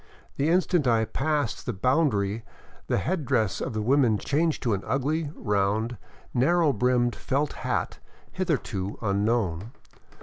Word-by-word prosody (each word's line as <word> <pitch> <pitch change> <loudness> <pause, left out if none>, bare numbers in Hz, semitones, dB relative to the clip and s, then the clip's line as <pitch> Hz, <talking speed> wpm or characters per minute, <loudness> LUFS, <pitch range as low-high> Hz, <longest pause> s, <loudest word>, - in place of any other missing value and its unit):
The 145 +3 +1
instant 175 -4 +2
I 115 -2 +3
passed 145 +2 -1
the - - -1
bound 135 - +2
ary 100 +3 -1 0.4
the - - +1
head 160 - -1
dress 115 -7 0
of - - -3
the 110 -1 -2
women 125 -3 +3
changed 155 - 0
to 115 -4 +1
an 95 - -1
ugly, 145 +3 -1
round, 105 +3 0 0.4
narrow 155 +4 +3
brimmed 120 +1 +2
felt 140 +2 -1
hat - - -2 0.3
hitherto 120 - -2
unknown. 100 -1 0
125 Hz, 140 wpm, -26 LUFS, 105-150 Hz, 0.4 s, I